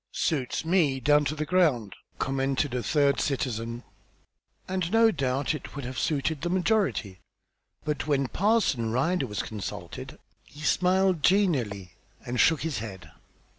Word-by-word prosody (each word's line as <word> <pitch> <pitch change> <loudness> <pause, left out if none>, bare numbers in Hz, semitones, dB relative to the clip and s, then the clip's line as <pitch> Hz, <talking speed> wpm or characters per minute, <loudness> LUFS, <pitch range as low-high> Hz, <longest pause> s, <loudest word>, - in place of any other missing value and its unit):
"Suits 145 -2 -1
me 160 -6 +2
down 145 +3 +3
ter 150 - -1
the 155 0 -2
ground!" 150 - +2 0.2
commented 135 0 -1
a 125 - -1
third 140 +1 +2
citizen; 120 -3 -2 0.8
and 185 -2 -2
no 225 0 +5
doubt 135 -3 -1
it 150 - -8
would 140 -3 -5
have 130 0 -4
suited 150 0 -1
the 175 - -2
majority, 180 - 0 0.7
but 150 -1 -2
when 140 -3 +1
Parson 185 - +1
Ryder 135 +5 +1
was 105 -2 -3
consulted, 105 -4 -7 0.3
he 145 - -14
smiled 185 +1 +2
genially 130 - +1 0.3
and 125 +1 -3
shook 160 -3 +4
his 160 -6 -2
head. 95 -7 -8
145 Hz, 140 wpm, -27 LUFS, 125-175 Hz, 0.8 s, no